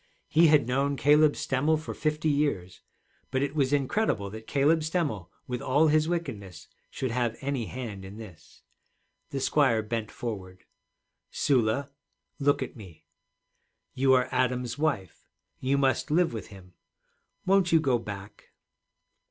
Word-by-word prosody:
He 165 +2 +5
had 150 -5 +5
known 140 +3 +1
Caleb 150 +2 +5
Stemmel 145 +4 +1
for 155 - -6
fifty 155 0 -1
years. 140 -12 -1 0.5
But 130 +1 0
it 140 0 -2
was 140 -3 +1
incredible 140 - 0
that 110 +1 -9
Caleb 145 +3 +3
Stemmel 155 - -2 0.2
with 125 -1 -4
all 145 +4 +3
his 155 +1 +3
wickedness 110 - -5 0.2
should 130 -3 -3
have 120 -1 -1
any 135 -4 -2
hand 115 -7 -6
in 95 +2 -10
this. 105 -8 -13 0.7
The 140 - -3
squire 130 -5 +2
bent 110 0 -3
forward. 95 -6 -7 0.7
'Sula, 130 +1 +1 0.5
look 140 -1 +2
at 130 - -8
me. 95 -8 -13 0.9
You 130 0 +3
are 125 -1 +3
Adam's 125 -1 0
wife. 140 - -3 0.3
You 135 +2 +1
must 135 +1 +1
live 165 -1 +2
with 110 - -6
him. 95 -3 -14 0.7
Won't 190 -2 +3
you 165 - +6
go 130 -6 +1
back?' 100 -2 -9
130 Hz, 145 wpm, -28 LUFS, 110-150 Hz, 0.9 s, you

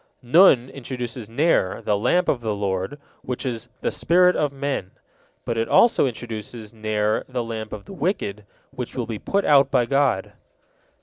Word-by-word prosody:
Nun 130 -2 +5
introduces 125 -3 -6
Ner, 120 - +1
"the 105 - +1
lamp 175 - +1
of 120 - +1
the 110 -2 -2
Lord," 100 +6 -2 0.2
which 125 +1 -5
is 120 -1 -4
"the - - 0
spirit 180 +2 +3
of 150 -2 0
men," 140 -8 -3 0.6
but 115 -2 -1
it 115 - -1
also 235 - +5
introduces 110 -2 -7
Ner, 110 -1 -1
"the 125 -2 -2
lamp 110 -1 -6
of 105 -2 -7
the - - -10
wicked," 145 - -2 0.3
which 130 -3 -6
will 125 -3 -2
be 110 -2 -5
put 200 0 -1
out 140 -2 +5
by 120 - +2
God. 135 -6 +1
120 Hz, 170 wpm, -23 LUFS, 110-140 Hz, 0.6 s, Nun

